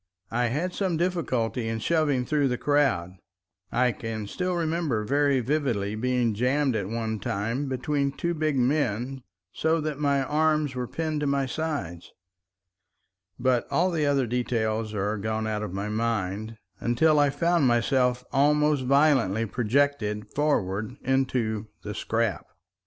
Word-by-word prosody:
I 120 +2 +1
had 160 +10 -2
some 185 -5 -1
difficulty 130 -10 -1
in 115 0 -1
shoving 145 0 +1
through 145 -1 +2
the 125 -1 -1
crowd; 125 -13 +1 0.5
I 125 +1 +3
can 115 -2 -5
still 180 - -2
remember 160 -9 0
very 140 +2 +2
vividly 120 -7 -1
being 120 0 0
jammed 130 +4 +1
at 100 -3 -2
one 110 -1 -2
time 115 +10 -2
between 140 +2 0
two 170 +4 -2
big 155 -3 0
men 130 -1 0 0.3
so 160 +1 +1
that 150 -2 -3
my 140 -2 +2
arms 150 0 +1
were 125 -1 -3
pinned 155 +1 -2
to 145 - -1
my 140 -1 +1
sides, 130 - -4 1.2
but 125 -1 +1
all 180 +2 +2
the 155 -4 0
other 140 -2 +2
details 115 -2 -1
are 105 +2 -1
gone 110 +1 -2
out 105 -1 -2
of 105 -4 -4
my 100 +2 -3
mind 110 -1 -2 0.2
until 150 +6 +3
I 145 -1 +4
found 165 +1 +2
myself 125 +1 +2
almost 150 0 +3
violently 130 -7 +3
projected 115 -2 0
forward 110 -7 0
into 125 -5 0 0.2
the 105 - -5
"scrap." 115 -1 -1
125 Hz, 145 wpm, -26 LUFS, 110-150 Hz, 1.2 s, I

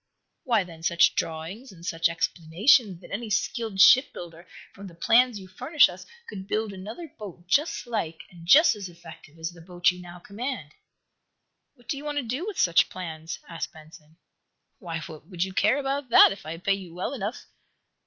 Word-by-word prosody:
"Why, 230 -6 +2
then, 165 -3 -13
such 170 +1 +4
drawings 170 +10 -4
and 170 -2 -13
such 165 -1 +1
explanations 180 - +2
that - - -14
any 220 +2 -4
skilled 215 0 -2
shipbuilder, 175 - +4 0.3
from 200 0 -10
the 170 - -13
plans 240 +3 +3
you 190 - -11
furnish 270 - +3
us, - - -11 0.2
could 190 -2 -8
build 215 -1 -2
another 215 - -9
boat 180 -5 -9
just 285 - +1
like, 205 -9 -3
and 175 -2 -14
just 305 - +7
as 200 -3 -7
effective, 165 -2 -14
as 165 +1 -4
the 170 -1 -15
boat 175 +1 +1
you 180 0 -10
now 175 0 -11
command?" 200 - -6 1.0
"What 245 -3 -24
do 295 - -2
you 280 - -8
want 295 -1 -4
to 285 - 0
do 255 - -4
with 420 - -5
such 170 -3 +4
plans?" 160 -3 -6
asked 165 -1 -6
Benson. 155 0 -16 0.6
"Why, 165 -6 -5
would 170 +2 -5
you 190 0 -5
care 215 +7 +3
about 275 -1 -2
that, - - +8
if 195 - -8
I 165 +1 -5
pay 195 +3 +1
you 185 -4 -7
well 185 +9 -3
enough?" 220 -2 -5
190 Hz, 185 wpm, -26 LUFS, 170-235 Hz, 1.0 s, that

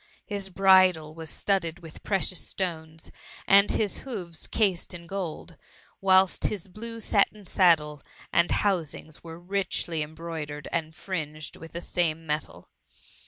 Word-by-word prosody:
His 200 -3 -4
bridle 185 -4 +5
was 160 -1 -8
studded 185 -5 0
wit^ 165 -3 -12
precious 190 -2 0
stones, 160 -4 -4 0.3
and 200 +1 +6
his 210 -3 0
hoofs 185 -11 -5
cased 190 -4 +1
in 170 -1 -9
gold; 170 -3 -5 0.4
whilst 190 -1 +4
his 200 -3 -1
blue 230 +4 -6
satin 210 -1 +1
saddle 155 -6 +3 0.3
and 170 - +4
housings 165 -5 -1
were 165 0 -9
richly 175 -3 -2
embroidered 155 -1 -5
and 160 -1 -2
fringed 155 -5 -5
with 165 - -11
the 170 - -4
same 165 -2 -1
metal. 150 0 -4
170 Hz, 130 wpm, -27 LUFS, 160-195 Hz, 0.4 s, and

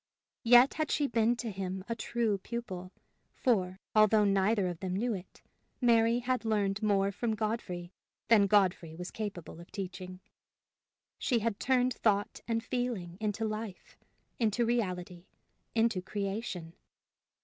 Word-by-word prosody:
Yet 245 +3 +7
had 310 -1 -1
she 290 - +1
been 235 -2 +2
to 235 -2 -4
him 190 -1 -4
a 230 - -2
true 230 -3 -1
pupil; 185 -5 -6 0.4
for, 190 -6 +1
although 215 0 +5
neither 200 +1 +2
of 175 -2 -3
them 185 -1 -3
knew 230 +4 0
it, 190 -2 -9 0.4
Mary 230 -1 +4
had 250 0 -1
learned 210 -2 0
more 200 -2 +2
from 220 +2 -1
Godfrey 205 -5 -3 0.3
than 210 -3 +6
Godfrey 185 -5 +2
was 180 +2 -6
capable 195 -7 -6
of 170 - -13
teaching. 185 -1 -6 1.0
She 245 - +1
had 225 -2 -1
turned 255 -1 +2
thought 205 -2 0
and 230 -1 0
feeling 240 -9 -3
into 215 +1 -1
life, 215 -3 -5 0.4
into 230 +1 +2
reality, 180 -6 -2 0.5
into 225 -4 +2
creation. 195 -3 -4
210 Hz, 140 wpm, -31 LUFS, 185-230 Hz, 1.0 s, Yet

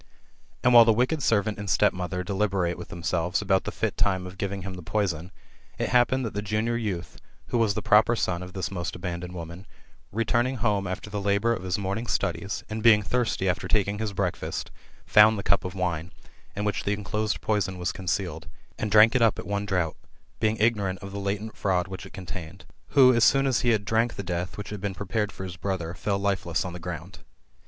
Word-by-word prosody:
And 125 - +5
while 120 -1 +10
the 115 - +4
wicked 130 +7 +1
servant 105 -3 +1
and 100 -1 -5
stepmother 90 0 +1
delibeiate 95 -2 0
with - - -8
themselves 85 +1 -1
about 95 -2 +1
the - - -3
fit - - -2
time«of 95 -1 -1
giving 100 -1 -3
him 95 0 -5
the 90 - -8
poison, 90 -2 -2 0.5
it - - -1
hap 125 -1 +4
pened 130 0 0
that 115 - -4
the 105 - -2
junior 110 +3 -1
youth, 100 -7 -4 0.3
who 120 - +1
was 110 -3 +2
the - - -3
proper 110 +3 +5
son 90 -5 -1
of 90 0 -8
this 95 -2 -3
most 85 -3 -4
abandoned 90 0 -5
woman, 85 +2 -8 0.4
returning 120 +4 +1
home 105 -4 0
after 95 +3 -5
the 105 -1 -2
labour 100 +3 +2
of 95 - -4
his 90 -1 -1
morn 100 +1 -2
ing 120 - -6
studies, 100 -1 -2
and 110 +1 -4
being 110 -2 +6
thirsty 115 -4 0
after 90 - -1
taking 100 -1 +1
his 110 -1 -2
breakfast, 100 - -3 0.3
found 105 +1 +6
the 100 - -4
cup 100 - +2
of 90 +1 -5
wine, 85 -2 -2 0.4
in 105 - -2
which 105 - -1
the 100 - 0
enclosed 105 +1 -2
poison 95 -4 -1
was 90 0 -1
concealed, 90 -3 -3 0.3
and 110 - -1
drank 110 +2 +7
it 125 - +2
up 115 -2 +4
at - - -6
one 100 0 -2
draught, 90 -5 0 0.4
being 110 0 +1
ignorant 105 -4 +1
of 100 - -7
the 100 - -5
latent 100 +2 -3
fmud 90 -2 0
which 95 0 -7
it - - -16
contained; 90 -1 -8 0.3
who, 130 -2 +8
as 115 -1 +3
soon 135 +3 +5
as 130 -3 +2
he 120 - +2
had 105 -3 +2
drank 115 +2 +1
the 100 - -5
death 90 0 -3
which 105 0 -6
had 105 -2 -6
been 100 -2 -3
prepared 105 +2 -2
for 95 - -8
his 90 -2 -7
brother, 85 -1 -3
fell 100 +2 -1
lifeless 95 -4 -1
on 90 - -5
the 90 - -7
ground. 85 +1 -7
100 Hz, 220 wpm, -26 LUFS, 90-110 Hz, 0.5 s, while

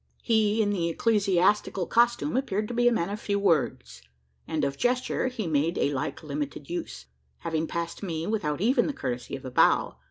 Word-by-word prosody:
He 220 -1 +2
in 205 - 0
the 170 -4 0
ecclesiastical 195 -1 +2
costume 240 - +2
appeared 215 -5 -1
to - - -4
be 240 0 +3
a - - +5
man 195 -5 0
of 210 - -4
few 200 -1 -1
words; 155 - 0 0.5
and 155 -2 -1
of 140 0 -2
gesture 250 - 0
he 250 -5 -4
made 160 +2 0
a 145 - +1
like 135 +3 -3
limited 145 -1 -5
use: 65 - -5 0.3
having 160 -1 -2
passed 170 +1 -4
me, 165 -5 -3
without 175 -8 -1
even 245 +7 +3
the 295 - -2
courtesy 125 - -4
of 135 - -9
a 130 - -6
bow. - - +3
175 Hz, 190 wpm, -27 LUFS, 150-220 Hz, 0.5 s, a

